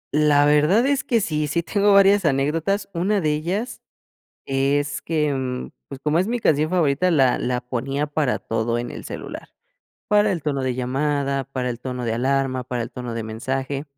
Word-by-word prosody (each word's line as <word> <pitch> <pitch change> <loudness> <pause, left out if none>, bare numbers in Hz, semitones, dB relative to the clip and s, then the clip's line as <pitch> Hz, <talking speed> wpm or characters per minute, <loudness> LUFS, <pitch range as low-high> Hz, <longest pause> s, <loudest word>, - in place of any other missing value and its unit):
La 150 -1 +4
verdad 150 - +4
es 275 -1 +1
que 230 -3 +1
sí, 155 -5 -1
sí 170 +3 -1
tengo 205 +4 +2
varias 200 0 +6
anécdotas. 160 +7 0
Una 195 +5 +1
de 155 -4 +1
ellas 180 +11 -3 0.6
es 140 +2 0
que, 150 -3 0
mm, 130 -1 -4 0.2
pues, 135 -1 -8
como 155 +2 +2
es 185 - +1
mi 245 +2 0
canción 155 -7 +2
favorita, 170 -1 +2
la 135 -7 +3
la 125 0 -1
ponía 135 +3 -3
para 145 -3 0
todo 115 +1 -2
en 120 0 -4
el - - -8
celular. - - -8 0.6
Para 210 0 +4
el 170 -4 -4
tono 140 -3 -1
de 130 -1 -1
llamada, 140 +2 -1
para 130 -2 -3
el 120 - -4
tono 125 -1 -5
de 115 - 0
alarma, 130 +1 0
para 125 -1 -3
el 115 - -6
tono 125 -1 -6
de 115 - -3
mensaje. 130 +5 -3
145 Hz, 190 wpm, -22 LUFS, 130-170 Hz, 0.6 s, varias